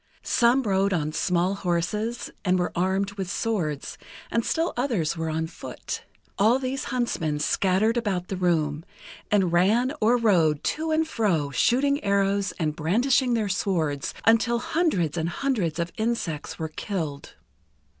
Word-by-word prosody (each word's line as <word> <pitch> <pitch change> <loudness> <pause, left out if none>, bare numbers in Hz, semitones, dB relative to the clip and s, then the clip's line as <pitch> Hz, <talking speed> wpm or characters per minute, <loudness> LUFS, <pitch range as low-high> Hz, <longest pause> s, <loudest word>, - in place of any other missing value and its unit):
Some 245 +2 +3
rode 195 -2 +1
on 155 -3 -1
small 180 +2 +1
horses, 200 +5 -2
and 185 -1 +2
were 180 -1 -1
armed 190 +3 0
with 195 -3 -5
swords, 180 -10 -2 0.3
and 230 - +1
still 330 +7 0
others 235 - 0
were 160 -1 -3
on 160 +1 -1
foot. 160 - -7 0.3
All 220 +5 +5
these 265 0 -3
huntsmen 230 - -1
scattered 195 +9 +1
about 195 -6 -1
the 195 - -3
room, 160 -4 0 0.5
and 190 -5 +2
ran 220 +10 +3
or 235 +3 +4
rode, 170 -10 +3
to 320 +1 -1
and 315 0 +1
fro, 180 - 0
shooting 280 - +2
arrows, 200 0 +1
and 155 -2 -1
brandishing 245 - +2
their 220 -2 0
swords; 165 -7 -1
until 230 +1 +4
hundreds 235 - 0
and 160 +1 -1
hundreds 200 - -1
of 170 0 -2
insects 220 -9 -2
were 160 -1 -4
killed. 155 -4 -5
195 Hz, 145 wpm, -25 LUFS, 165-235 Hz, 0.5 s, All